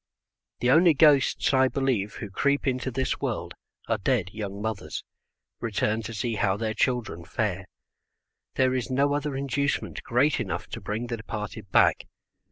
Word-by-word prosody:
The 125 - +3
only 165 +2 +6
ghosts, 145 -2 +4
I 130 0 +5
believe, 130 -7 -1
who 110 -6 -7
creep 140 +7 +1
into 130 -1 0
this 130 +1 -1
world, - - -3 0.3
are 115 -1 0
dead 100 -4 0
young 100 -2 -5
mothers, 100 -8 -4 0.6
returned 110 0 -1
to 115 - -5
see 115 +2 -1
how 95 -1 +1
their 110 0 -2
children 120 -9 -1
fare. 95 0 -2 0.9
There 130 -1 +3
is 130 -1 -2
no 140 +2 +2
other 145 -1 -2
inducement 140 +1 -1
great 135 +5 +2
enough - - -3
to - - -6
bring 110 +3 -3
the 120 -1 -3
departed 105 -1 -6
back. - - +3
120 Hz, 160 wpm, -26 LUFS, 105-135 Hz, 0.9 s, only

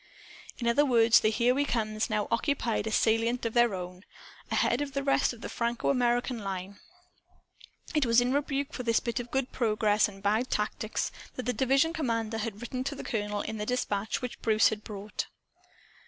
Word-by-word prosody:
In 235 - -3
other 235 +5 +4
words, 230 -4 +5
the 215 - +2
"Here 240 +3 +2
We 280 +2 +1
Comes" 220 -4 -1
now 210 -2 0
occupied 230 -3 0
a - - -2
salient 225 +3 +2
of 230 - -1
their 240 -4 +4
own, 180 0 -7 0.5
ahead 240 - +1
of 285 -1 -4
the 275 -1 -1
rest 275 0 +2
of 235 -2 -11
the - - -5
FrancoAmerican 240 0 0
line. 195 0 -5 1.1
It 300 -5 +2
was 230 +1 +5
in 245 +1 +1
rebuke 280 +1 -1
for - - -4
this 230 -2 +2
bit 235 +1 -3
of 245 0 -6
good 265 0 -1
progress 215 -3 +2
and 195 -1 -12
bad 220 +5 +1
tactics 210 +1 -2 0.2
that 255 - -4
the 250 - -1
division 270 +6 +2
commander 230 -7 -1
had 215 -1 -4
written 255 +2 -3
to 280 - -2
the - - -7
colonel, 210 -3 -2
in 220 - -5
the 210 - -3
dispatch 220 -3 -1
which 250 - -5
Bruce 220 -1 +4
had 215 -1 -5
brought. 205 0 -5
235 Hz, 190 wpm, -29 LUFS, 215-255 Hz, 1.1 s, words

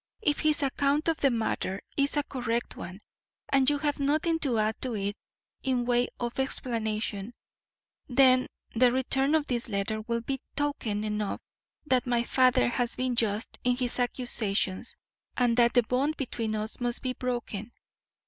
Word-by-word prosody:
If 295 -7 +2
his 305 -1 +2
account 280 +3 +1
of 325 - +1
the 275 - +3
matter 220 -5 -1 0.2
is 280 +1 +1
a 290 - +2
correct 240 -3 -2
one, 185 +4 -8 0.5
and 270 -1 +4
you 290 - +1
have 290 0 -1
nothing 310 +4 +1
to 265 -7 +1
add 215 0 0
to 250 -3 -2
it 200 0 -2 0.5
in 255 -2 0
way 245 0 +2
of 240 +1 -3
explanation, 220 -4 -2 0.7
then 255 0 +5 0.3
the 245 +1 +5
return 270 +3 +2
of 310 -2 +2
this 240 -2 -2
letter 215 +1 -1
will 235 +1 -2
be 270 +3 -3
token 245 -8 -1
enough 210 -1 -2 0.4
that 255 -3 +2
my 240 -1 +2
father 255 +1 +4
has 240 0 0
been 255 -1 -1
just 220 -2 0
in 250 0 +2
his 250 -1 -1
accusations 235 -5 0 0.4
and 245 -2 +3
that 235 0 +4
the 245 - +6
bond 265 +7 0
between 230 -5 -2
us 215 +1 -4
must 245 -1 -1
be 255 -1 -1
broken. 240 -4 -4
245 Hz, 165 wpm, -28 LUFS, 225-270 Hz, 0.7 s, the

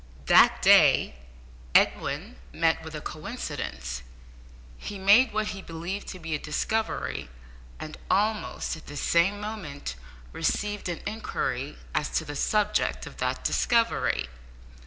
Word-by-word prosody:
That - - +6
day - - +6 0.6
Edwin - - +2
met 165 0 +1
with 160 -1 -8
a 150 - -5
coincidence, 65 - -5 0.8
he 205 - -6
made 205 +7 +6
what 215 0 -1
he 195 -2 -6
believed 170 +4 -5
to 185 - -6
be 165 -1 -4
a 150 - 0
discovery, 150 - -2 0.5
and 155 - -8
almost 210 -1 0
at 160 - -13
the 145 - -7
same 170 +7 +2
moment 200 - -5 0.4
received 205 - -1
an 170 - -4
inquiry 145 - -3 0.2
as 150 -1 0
to - - -1
the 145 - -6
subject 210 +7 +1
of - - -11
that - - -2
discovery. 230 - +2
170 Hz, 130 wpm, -27 LUFS, 150-210 Hz, 0.8 s, That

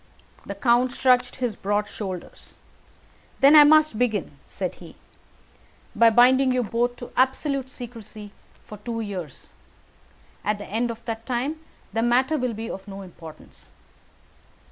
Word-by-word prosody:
The 200 - -5
count 240 +3 +2
shrugged 250 -1 +2
his 245 -5 -2
broad 205 +2 -1
shoulders. 190 -4 -8 0.8
"Then 280 +3 +7
I 300 - +11
must 305 -5 +4
begin," 205 - -1
said 185 -2 -4
he, 170 - -12 1.0
"by 230 0 +6
binding 255 +3 +5
you 250 -1 +1
both 240 +3 -1
to 245 - -10
absolute 265 +1 0
secrecy 220 -4 -10 0.3
for 210 - -11
two 230 +1 -4
years; 185 - -7 0.9
at 210 0 0
the 205 - -8
end 230 +4 -1
of 230 0 -8
that 225 -1 -5
time 265 +5 -2 0.3
the 225 - 0
matter 260 +6 +2
will 250 -3 -2
be 225 +1 -5
of 195 -1 -7
no 195 0 -8
importance. 165 -4 -14
235 Hz, 145 wpm, -24 LUFS, 205-255 Hz, 1.0 s, I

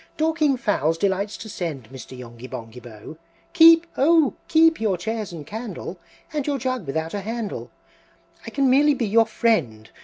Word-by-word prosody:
Dorking 310 -3 +1
fowls 165 - 0
delights 200 +3 -1
to 225 - -9
send, 165 - -5
Mr. 130 0 -10
Yonghy 120 0 -10
Bonghy 115 +2 -8
Bò! 120 +5 -11 0.4
Keep, 330 0 +7
oh, 310 0 +4
keep 325 -3 +4
your 205 -5 +1
chairs 220 +2 -4
and 160 -4 -8
candle, 205 -4 -7 0.3
And 295 -2 -2
your 285 -1 0
jug 255 - -3
without 160 +3 -3
a 205 - -3
handle, 225 0 -5 0.7
I - - -7
can 275 -1 +1
merely 285 +3 +4
be 245 - -1
your 225 +2 +3
friend! 135 - -1
215 Hz, 165 wpm, -23 LUFS, -, 0.7 s, Keep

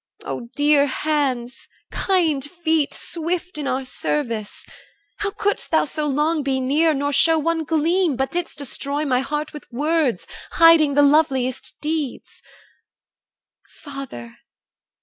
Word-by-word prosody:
O 235 - -5
dear 290 -1 +4
hands, 265 -4 -2 0.2
kind 330 -8 +1
feet, 320 -1 0
Swift 345 0 -4
in 285 - -3
our 260 0 -1
service, 235 -5 -3 0.5
how 410 - -1
couldst 410 +1 -2
thou 320 - +3
so 300 +1 -3
long 300 +3 +1
Be 270 -1 0
near, 300 +5 +2
nor 285 +1 -1
show 325 +3 +4
one 325 +1 0
gleam, 325 +1 +1
but 265 +2 -2
didst 350 0 -3
destroy 285 +1 -2
My 255 -3 +2
heart 295 +2 -3
with 300 - -11
words, 290 - 0 0.3
hiding 330 -4 +6
the 290 - +5
loveliest 275 -4 +2
deeds? 305 -3 -4 1.3
Father! 270 - -9
295 Hz, 130 wpm, -21 LUFS, 270-320 Hz, 1.3 s, hiding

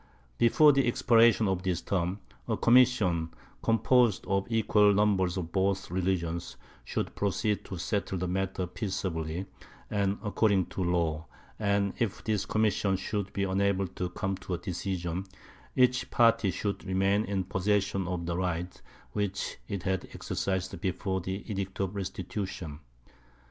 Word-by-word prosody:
Before 145 +6 +6
the 135 -3 +2
expiration 115 -3 +4
of 95 -1 0
this 90 -3 -1
term 95 +1 -2 0.3
a - - 0
commission, 110 -10 +3 0.3
composed 115 -1 +3
of 95 0 0
equal 105 -2 +4
numbers 95 -3 +2
of 85 -3 -4
both 95 -1 0
religions, 85 -2 -1 0.3
should - - -3
proceed 105 +1 0
to 95 - -6
settle 100 +2 -2
the 90 +1 -2
matter 95 0 -1
peaceably 90 -3 -3 0.5
and 100 -1 +1
according 100 -3 +2
to 95 - -3
law; 85 -2 0 0.3
and 100 -2 +1
if 115 -4 -1
this 105 -3 -1
commission 105 -3 +1
should 100 0 -3
be 100 - -1
unable 100 0 +1
to 90 +1 -4
come 95 +2 -2
to 90 -1 -4
a - - -4
decision, 90 -2 -3 0.5
each 125 -1 +3
party 115 -3 +4
should 100 +2 -3
remain 95 +2 +2
in 100 -3 -1
possession 95 0 0
of 90 -2 -3
the 85 0 -2
rights 90 0 -3 0.3
which 100 -2 -2
it 100 -3 -4
had 95 -1 -1
exercised 95 -2 -2
before 95 0 -1
the 95 +3 -4
Edict 100 -3 -4
of 95 0 -1
Restitution. 95 -4 -5
95 Hz, 145 wpm, -29 LUFS, 90-105 Hz, 0.5 s, Before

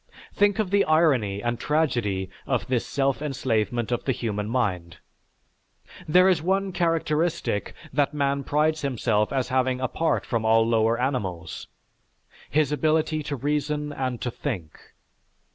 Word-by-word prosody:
Think 205 -1 +3
of 210 -4 -1
the 200 0 +4
irony 130 -11 +2
and 120 0 -1
tragedy 120 -12 0 0.2
of - - 0
this 125 -2 -1
self 135 0 0
enslavement 120 -5 -1
of 120 - -1
the 135 - +2
human 105 -4 -3
mind! 90 -9 -1 1.1
There 180 +4 +5
is 180 -5 +3
one 190 +3 0
characteristic 165 - 0 0.2
that 140 0 +2
man 140 -2 0
prides 155 +3 +1
himself 115 -6 0
as 130 -2 -1
having 130 -1 +1
apart 130 +6 0
from 115 -2 -1
all 115 0 +4
lower 115 0 +2
animals, 95 - -3 0.8
his 150 -1 +2
ability 155 +1 +1
to 145 -1 -4
reason 150 +2 -2
and 130 -3 -3
to 125 - -2
think. 95 - -5
135 Hz, 140 wpm, -25 LUFS, 115-155 Hz, 1.1 s, There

